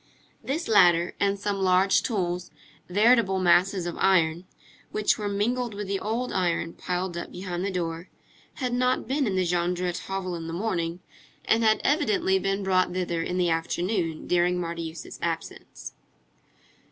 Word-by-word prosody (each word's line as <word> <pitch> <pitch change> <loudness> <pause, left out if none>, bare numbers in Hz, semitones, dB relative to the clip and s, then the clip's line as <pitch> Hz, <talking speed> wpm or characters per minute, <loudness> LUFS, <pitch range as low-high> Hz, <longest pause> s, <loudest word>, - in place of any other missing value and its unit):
This 310 +6 -2
ladder, 175 -5 +4
and 200 0 +1
some 205 0 -2
large 185 +1 +4
tools, 180 -5 -2 0.4
veritable 210 0 +4
masses 185 +1 +3
of 175 - -4
iron, 175 -2 +2 0.5
which 215 0 +1
were 205 -1 -2
mingled 230 +3 -1
with 205 -1 -5
the 195 0 -1
old 235 +4 -2
iron 170 -2 0
piled 180 0 -3
up 170 - -6
behind 180 -1 -4
the 200 - -1
door, 170 -1 -4 0.5
had 250 -3 -2
not 250 0 +1
been 270 0 0
in 195 - -1
the 185 -1 +1
Jondrette 175 0 -1
hovel 190 -2 -3
in 165 -1 -6
the 165 - -5
morning, 175 -3 -2 0.4
and 230 +1 +3
had 220 -1 +3
evidently 215 - +2
been 195 +1 -1
brought 185 -1 +2
thither 175 -2 -2
in 180 +2 -3
the 175 -2 +2
afternoon, 165 +1 -1
during 180 0 +2
Marius' 165 -1 -6
absence. - - -5
185 Hz, 155 wpm, -26 LUFS, 175-205 Hz, 0.5 s, ladder